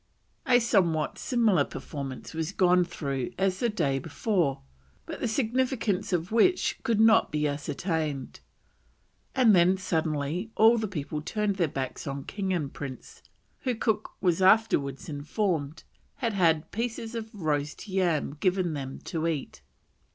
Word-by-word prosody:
A 250 -1 +6
somewhat 175 -9 +1
similar 220 - +3
performance 140 -1 -7
was 160 +3 -3
gone 180 -2 +4
through 140 -7 -4
as 190 0 +1
the 240 - +1
day 140 -10 0
before, 165 - -1 0.4
but - - -7
the - - -1
significance 230 -4 0
of 175 +1 -1
which 360 +12 +3
could 225 -2 0
not 225 0 +5
be 150 0 +1
ascertained, 150 -1 -3 1.0
and 240 -6 +6
then 180 +2 +4
suddenly 160 +1 -1
all 225 +2 +6
the 215 - -1
people 150 -4 -4
turned 210 +4 -1
their 170 -4 +2
backs 135 -1 -5
on 140 0 -4
king 195 +3 -3
and 155 -7 -2
prince, 135 -3 -8 0.4
who, 255 -2 -1
Cook 220 -1 -1
was 180 -1 +2
afterwards 185 - +3
informed, 155 0 -2 0.3
had 235 -5 -2
had 165 -4 +2
pieces 230 0 -3
of 225 -1 -5
roast 150 -2 -2
yam 180 -7 0
given 185 -2 +1
them 135 -2 -5
to 165 -2 -2
eat. 150 - -4
180 Hz, 145 wpm, -28 LUFS, 150-215 Hz, 1.0 s, A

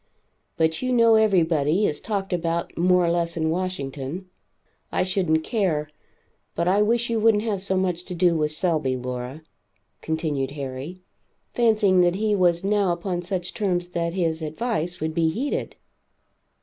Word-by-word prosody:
But 160 0 +1
you 255 0 -1
know 230 -2 +5
everybody 175 -5 +3
is 150 - -1
talked 195 -4 -3
about 170 -1 -2
more 180 +1 +3
or 170 - +2
less 170 -1 -1
in 160 -1 +1
Washington. 165 -2 -4 0.6
I - - +1
shouldn't 180 -4 +1
care; 160 -9 -1 0.6
but 170 - 0
I 195 +3 +3
wish 235 +2 +1
you 230 - +1
wouldn't 215 -1 +3
have 210 -4 -2
so 190 -1 0
much 180 -2 -1
to 180 - -6
do 175 -1 +3
with 150 -1 0
Selby, 155 -6 0
Laura," 125 +4 -6 0.6
continued 155 -4 -2
Harry, 140 +7 -6 0.5
fancying 215 -6 +3
that 175 0 +3
he 210 +1 +1
was 175 -2 +2
now 200 -2 +2
upon 175 +1 -2
such 180 0 -4
terms 180 -4 -1
that 170 -1 -2
his, 165 -3 0
advice, 175 +1 -3
would 160 0 -2
be 165 0 +2
heeded. 260 - -3
175 Hz, 160 wpm, -24 LUFS, 160-195 Hz, 0.6 s, know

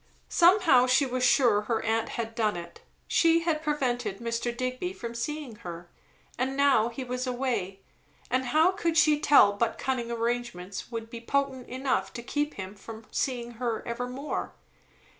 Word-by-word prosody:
Somehow, 340 -8 +5
she 255 +3 +4
was 255 -1 -2
sure, 240 -4 +4
her 225 -1 -1
aunt 225 0 0
had 230 -1 -3
done 215 -5 0
it; 170 0 -9 0.3
she 330 0 +4
had 325 -2 0
prevented 245 -9 -1
Mr. 235 +1 -3
Digby 255 +9 -3
from 235 -10 -6
seeing 270 -1 -4
her; 175 -1 -9 0.5
and 265 +2 -1
now 270 -5 +4
he 240 +3 -6
was 250 +1 -3
away, 235 -7 -2 0.5
and 255 +1 +1
how 310 +8 +4
could 340 -4 -1
she 305 -2 +5
tell 280 -9 +6
but 225 +2 -1
cunning 250 -3 -2
arrangements 230 -5 -3
would 230 -1 -6
be 235 - -7
potent 265 0 -1
enough 260 +1 -1
to 235 - -6
keep 290 +4 -2
him 190 0 -6
from 220 +2 -11
seeing 240 -3 -2
her 235 -3 -2
evermore? 250 +4 -4
245 Hz, 160 wpm, -28 LUFS, 230-275 Hz, 0.5 s, tell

